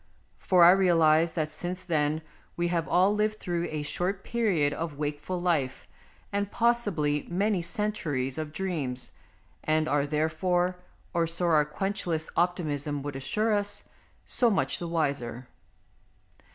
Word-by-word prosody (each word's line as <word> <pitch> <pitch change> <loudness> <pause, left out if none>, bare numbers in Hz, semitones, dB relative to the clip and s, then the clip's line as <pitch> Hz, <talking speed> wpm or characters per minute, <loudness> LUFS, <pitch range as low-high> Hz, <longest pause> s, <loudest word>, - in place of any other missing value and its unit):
For 180 -2 +4
I 170 - +10
realize 165 -3 +4
that 155 -2 -2
since 180 +4 -5
then 155 -3 0 0.3
we 175 0 0
have 170 -2 0
all 185 +3 +4
lived 215 0 0
through 175 -3 -2
a 155 -1 -3
short 185 +6 -2
period 190 -12 +1
of 160 -3 -4
wakeful 150 +5 -3
life 160 -7 -1 0.5
and 200 0 0
possibly 205 -12 +1
many 195 +2 +1
centuries 165 -8 -2
of 155 -1 -4
dreams, 150 -8 -3 0.5
and 155 0 +1
are 145 -1 +1
therefore, 175 +4 0 0.4
or 170 -1 +1
so 170 +2 0
our 155 -3 +4
quenchless 170 -1 -2
optimism 150 -5 0
would 145 -1 -5
assure 210 +12 0
us, 205 0 -1 0.4
so 240 - +3
much 200 - +1
the 175 - -4
wiser. 140 -7 -2
170 Hz, 140 wpm, -28 LUFS, 150-185 Hz, 0.5 s, I